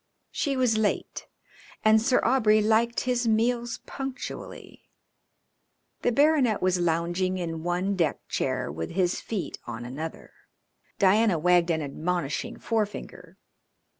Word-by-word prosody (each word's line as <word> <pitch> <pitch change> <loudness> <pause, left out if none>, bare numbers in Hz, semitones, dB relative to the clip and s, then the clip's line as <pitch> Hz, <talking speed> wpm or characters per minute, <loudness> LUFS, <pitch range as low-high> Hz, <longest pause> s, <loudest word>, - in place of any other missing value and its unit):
She 275 -2 -1
was 240 -4 +2
late, 210 -2 -2 0.6
and 215 0 +6
Sir 250 +2 +3
Aubrey 225 -4 +4
liked 225 +2 +2
his 245 -1 0
meals 235 +2 0
punctually. 270 -1 -7 1.1
The 245 - +2
baronet 280 -4 +3
was 185 -1 +1
lounging 175 +2 0
in 165 -3 -4
one 180 +4 -1
deck 165 -6 -1
chair - - -2
with 80 +2 -5
his 180 0 0
feet 190 -9 -4
on 120 0 -6
another. 150 +6 -7 0.6
Diana 200 -1 +4
wagged 175 +1 +3
an 160 -2 0
admonishing 165 +7 -3
forefinger. 215 -3 -4
200 Hz, 120 wpm, -26 LUFS, 170-235 Hz, 1.1 s, and